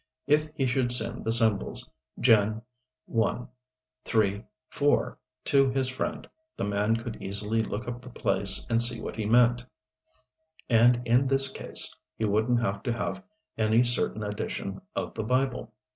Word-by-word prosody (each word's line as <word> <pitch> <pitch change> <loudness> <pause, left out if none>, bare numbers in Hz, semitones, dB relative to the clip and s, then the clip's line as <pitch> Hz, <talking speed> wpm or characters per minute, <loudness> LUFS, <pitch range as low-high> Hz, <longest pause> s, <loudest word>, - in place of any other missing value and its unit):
If 150 +2 +2
he 135 - 0
should 125 -1 0
send 120 -2 -1
the 115 - +1
symbols 110 -4 +2 0.3
"Gen. 110 -2 +3 0.4
1, 115 +2 -1 0.6
3, 105 -2 0 0.3
4" 145 0 +1 0.3
to 135 -1 +4
his 130 0 0
friend, 130 - -4 0.3
the - - -3
man 105 +2 0
could 115 0 -6
easily 105 +3 -1
look 110 +1 -5
up 120 0 -5
the 125 - -11
place 100 -5 +1
and 115 0 +1
see 120 -1 +6
what - - -6
he 110 -2 -3
meant. 120 +1 +4 1.0
And 120 +1 +4
in 125 +3 +3
this 135 0 +3
case - - 0 0.2
he 110 - -1
wouldn't 110 +4 +1
have 100 -2 -2
to 120 - -2
have 120 +10 -4 0.4
any 110 +2 +3
certain 120 -3 -1
edition 105 0 -5
of - - -3
the 110 - -4
Bible. 125 0 -1
115 Hz, 155 wpm, -27 LUFS, 110-125 Hz, 1.0 s, see